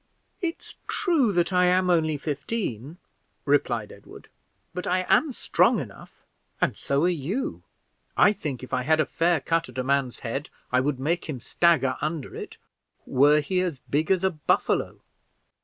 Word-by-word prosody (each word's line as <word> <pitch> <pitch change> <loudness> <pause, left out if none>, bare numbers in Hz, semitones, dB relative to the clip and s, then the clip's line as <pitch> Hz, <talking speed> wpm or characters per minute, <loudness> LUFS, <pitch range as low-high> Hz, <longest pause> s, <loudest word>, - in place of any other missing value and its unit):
"It's 335 -2 -4
true 305 - +2
that 175 +1 +1
I 180 0 +4
am 180 0 +3
only 155 -3 +2
fifteen," 145 - -4 0.5
replied - - +1
Edward, - - -14 0.4
"but 180 +1 -4
I 185 +1 +1
am 305 - +3
strong - - +2
enough, - - -10 0.4
and - - +1
so 140 +2 0
are - - +4 0.2
you. 235 +9 -2 0.6
I 205 - +6
think 140 - -5
if 130 - -9
I - - +1
had 155 +5 +2
a 155 - +3
fair 170 0 +1
cut 165 +1 -1
at 125 - -12
a 130 - 0
man's 135 -2 0
head 135 +5 -4 0.2
I 125 - +4
would 135 0 -1
make 165 +6 -1
him 150 -6 -5
stagger 135 -2 +2
under 155 -2 -3
it, - - -8 0.5
were 145 +3 +4
he 180 +5 0
as 175 -6 -2
big 150 +3 +1
as 190 -1 +2
a 190 - +3
buffalo. 150 -3 0
160 Hz, 170 wpm, -25 LUFS, 140-180 Hz, 0.6 s, I